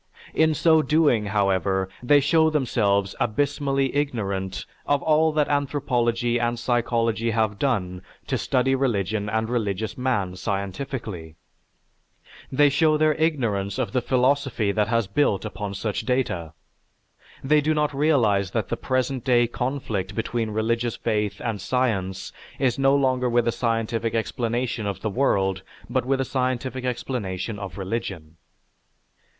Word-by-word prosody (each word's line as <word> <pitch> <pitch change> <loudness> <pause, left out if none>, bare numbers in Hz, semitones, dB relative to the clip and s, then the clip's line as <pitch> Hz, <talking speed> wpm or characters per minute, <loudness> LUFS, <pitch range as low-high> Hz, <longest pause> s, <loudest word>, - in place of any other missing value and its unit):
In 160 -1 +3
so 160 +1 +4
doing, 150 -9 +2
however, 95 -1 +1
they 145 +4 +5
show 160 +3 +4
themselves 100 -9 +1
abysmally 135 +2 0
ignorant 100 -9 -2 0.2
of 145 -1 +1
all 160 0 +3
that 150 -1 +2
anthropology 120 -5 0
and 120 0 0
psychology 115 -1 0
have 110 -2 0
done 90 -10 -1 0.2
to - - -1
study 135 -1 +1
religion 110 -6 0
and 110 +1 0
religious 110 -2 -2
man 100 -8 0
scientifically. 100 - -4 1.2
They 145 +2 +5
show 155 +2 +3
their 155 0 +3
ignorance 120 -11 0
of 120 -6 -1
the 125 - +1
philosophy 130 -4 +1
that 105 0 +1
has 115 -1 +1
built 100 0 +1
upon 105 -1 -5
such 105 +1 -2
data. 105 -11 -1 0.9
They 150 +2 +4
do 155 +2 +1
not 150 -1 +1
realize 120 -10 +2
that - - -2
the - - -1
present 130 0 -1
day 120 -2 +4
conflict 115 -6 -3
between 115 0 -2
religious 115 +2 -1
faith 105 -2 -1
and 110 -5 -3
science 100 -7 -1 0.2
is 130 -1 +1
no 135 +1 +4
longer 130 -2 +2
with 120 0 +2
a - - +3
scientific 115 -1 -1
explanation 115 0 -1
of 100 - -4
the 110 - -2
world, 95 -6 +1 0.3
but 125 +1 -1
with 135 +1 +1
a 135 - 0
scientific 130 0 -2
explanation 110 -5 -3
of 95 -3 -7
religion." 90 -6 -5
120 Hz, 140 wpm, -24 LUFS, 100-135 Hz, 1.2 s, they